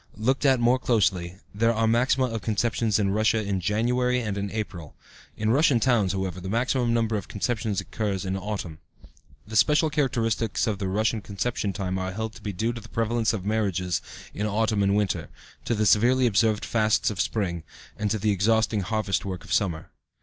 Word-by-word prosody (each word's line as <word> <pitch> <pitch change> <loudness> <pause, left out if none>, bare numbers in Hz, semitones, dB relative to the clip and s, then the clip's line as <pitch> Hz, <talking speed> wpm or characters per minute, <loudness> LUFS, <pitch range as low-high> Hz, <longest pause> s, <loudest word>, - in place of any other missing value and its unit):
Looked 130 +6 +1
at 130 -2 +4
more 120 +2 +3
closely, 95 -7 +1 0.2
there 115 +3 +2
are 115 +1 +1
maxima 125 +3 +2
of 115 -3 -4
conceptions 110 0 0
in 100 -2 +1
Russia 110 +2 +2
in 100 -1 -1
January 125 +6 +1
and 105 -5 -3
in 100 0 -3
April. 95 -8 -6 0.4
(In 110 +1 +1
Russian 140 -1 +4
towns, 110 -6 +2
however, 95 -1 -3
the 95 - -5
maximum 120 +2 +1
number 115 -2 +1
of 100 - -6
conceptions 110 -1 -2
occurs 100 -3 -3
in 95 - -2
the 95 - -2
autumn.) 95 -6 -5 0.7
The 110 - -8
special 150 +6 +4
characteristics 115 -6 0
of 105 -3 -2
the 95 - -2
Russian 110 +3 0
conception 105 +2 -2
rate 95 -1 -2
are 95 0 -3
held 110 +1 -4
to 115 - -13
be 105 - -4
due 110 +6 -1
to 115 - -7
the 110 - -14
prevalence 115 0 0
of 100 -4 -4
marriages 95 -5 0 0.3
in 105 - -2
autumn 105 0 +1
and 100 0 +2
winter, 105 -2 -1 0.4
to 120 - 0
the 105 0 +1
severely 120 +6 +4
observed 110 -1 +2
fasts 110 -1 +2
of 95 -6 -1
spring, 90 -5 -2 0.3
and 105 -1 -2
to 110 - 0
the 105 +1 +1
exhausting 110 +2 +2
harvest 100 0 -1
work 95 -2 -5
of - - -5
summer. 85 -6 -1
110 Hz, 195 wpm, -25 LUFS, 100-115 Hz, 0.7 s, at